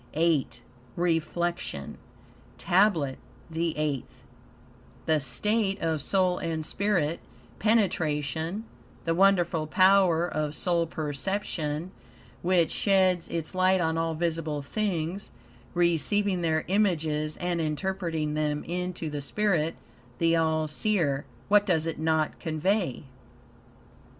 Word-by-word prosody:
VIII 160 -3 +3 0.5
REFLECTION 170 - -1 0.6
TABLET 175 -8 +2 0.3
THE 165 0 -1
EIGHTH 140 -4 -3 0.8
The 160 -2 +3
state 195 - 0
of 160 -4 -1
soul 185 +3 +1
and 160 -2 -3
spirit 175 -5 0 0.4
penetration; 170 -4 0 0.4
the 165 - +2
wonderful 175 -4 +3
power 185 -1 +4
of 155 -2 -2
soul 170 -1 0
perception, 155 +1 -3 0.5
which 175 -2 +2
sheds 185 -3 +2
its 165 0 -4
light 185 0 +3
on 160 -2 +1
all 165 0 -1
visible 160 -3 -2
things, 185 +1 -2 0.5
receiving 175 +3 +2
their 160 -2 0
images 160 -6 +1
and 175 -2 -1
interpreting 160 -1 -2
them 150 -1 -1
into 180 -1 -4
the 145 -1 -4
spirit, 165 0 0 0.4
the 165 0 +3
all 160 -1 +1
seer 155 -5 0 0.2
what 205 0 +5
does 170 -6 +1
it 165 -2 -3
not 160 -1 0
convey? 165 - -1
165 Hz, 105 wpm, -27 LUFS, 155-185 Hz, 0.8 s, what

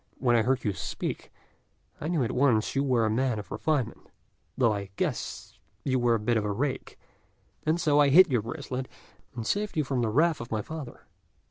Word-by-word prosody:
But - - -28
when 120 -2 +4
I 115 - +5
heard 130 +3 +1
you 105 - 0
speak, 90 - -5 0.7
I 150 - -4
knew 165 -5 +1
at 115 - -1
once 125 -4 +2
you 135 - +2
were 125 -5 +2
a - - +1
man 125 0 +1
of 105 - -8
refinement, 145 -7 -2 0.5
though 115 -4 +3
I 100 -1 -4
guessed - - -4 0.3
you 130 -1 +1
were 120 -1 +3
a - - -1
bit 115 +2 +1
of 110 - 0
a 105 - -1
rake; 130 +6 -3 0.7
and 160 +2 +2
so 150 -3 +3
I 145 -1 +5
hid 175 +3 +7
your 120 -3 +2
bracelet, 130 +2 -5 0.5
and 115 -2 -4
saved 205 - -1
you 155 - +3
from 130 -2 -1
the 115 - +1
wrath 155 +6 +2
of 120 - -7
my 110 -2 -2
father." 155 -5 -8
130 Hz, 215 wpm, -28 LUFS, 115-145 Hz, 0.7 s, hid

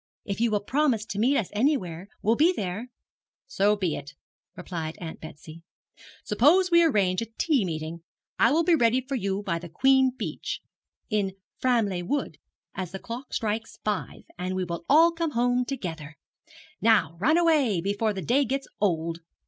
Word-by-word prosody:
If 200 +2 -3
you 235 - +3
will 210 -2 0
promise 255 -3 +1
to 205 -2 -5
meet 265 +6 +3
us 205 - -1
anywhere, 200 - 0 0.2
we'll 225 +3 +3
be 320 +8 +4
there.' 205 - -4 0.6
'So 210 -5 +2
be 185 -6 -1
it,' 145 0 -9 0.4
replied 165 -3 -5
Aunt 165 -2 -7
Betsy. 155 +1 -11 0.6
'Suppose 325 - +4
we 340 0 +6
arrange 200 - +2
a 230 - -4
tea 290 -9 +2
meeting. 160 -1 -4 0.4
I 230 - +5
will 325 +3 +3
be 345 +1 +3
ready 245 -4 +3
for 265 +2 -7
you 200 -4 -1
by 170 -4 -1
the 175 0 -9
Queen 265 +8 +4
Beech, - - -4 0.5
in 200 -3 0 0.2
Framleigh 225 -8 +1
Wood, 290 +5 -2 0.3
as 185 -3 -4
the 195 - -5
clock 240 +6 -8
strikes 220 +1 -3
five, 210 -3 -3 0.2
and 185 +1 -2
we 185 - -1
will 170 -1 -5
all 325 +4 +6
come 330 -2 -3
home 245 +1 +2
together. 165 - -6 0.3
And - - -22 0.3
now 210 -8 +3
run 310 - +3
away, 300 - +3
before 205 +4 0
the 195 -3 -5
day 265 - +3
gets 275 0 -2
old. 165 -4 0
210 Hz, 175 wpm, -26 LUFS, 180-265 Hz, 0.6 s, we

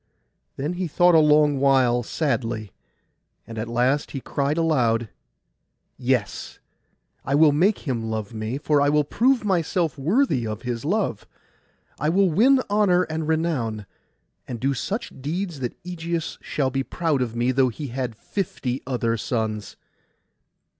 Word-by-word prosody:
Then 145 +5 -2
he 180 0 -2
thought 175 +3 +4
a 160 - +7
long 150 -2 +4
while 130 -3 +3
sadly; 115 -6 -2 0.7
and 115 -1 -7
at 110 - -3
the - - -7
last 125 +5 +1
he 135 - -3
cried 140 +3 -1
aloud, 120 -9 +1 0.9
'Yes! 125 -4 -2 0.7
I 140 - 0
will 150 0 +6
make 175 +5 +1
him 115 -4 -2
love 110 0 -4
me; 110 +3 -3
for 145 0 +2
I 145 - +3
will 150 0 +3
prove 240 - +2
myself 170 -5 0
worthy 165 - +1
of 110 +2 -5
his 120 -2 -3
love. 185 - -1 0.7
I 150 - +1
will 190 +1 +3
win 255 - +4
honour 200 -3 +3
and 160 -1 -2
renown, 140 -10 -1 0.6
and 120 -2 -5
do 135 +3 +1
such 205 - -4
deeds 170 +2 -3
that 125 -2 -4
Ægeus 170 -2 -4
shall 135 -3 -1
be 135 +1 0
proud 155 0 -1
of 120 -2 -2
me, 120 +2 +1
though 130 0 +3
he 135 +4 -6
had 125 -2 -3
fifty 130 - -3
other 115 -3 0
sons! 110 -2 -3
140 Hz, 155 wpm, -24 LUFS, 120-165 Hz, 0.9 s, a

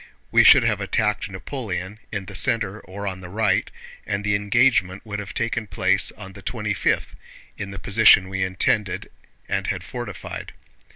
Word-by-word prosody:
We - - +6
should - - +8
have - - +1
attacked 105 -2 0
Napoleon 100 -2 -5
in 100 -3 -4
the 105 - -10
center 105 +1 +1
or 100 +2 -8
on 95 -1 -4
the 90 - -9
right, 105 0 +1 0.3
and 100 0 -3
the 105 0 +1
engagement 100 -1 +2
would 105 -1 -4
have 105 0 -7
taken 115 -1 -1
place 95 0 +1
on 95 -2 -10
the 100 - -11
twenty 105 0 -2
fifth, - - 0 0.4
in 100 - -6
the 100 - -7
position 100 -2 +5
we 95 0 -3
intended 95 +1 0 0.4
and - - -1
had - - -2
fortified. - - -7
100 Hz, 170 wpm, -23 LUFS, 95-105 Hz, 0.4 s, should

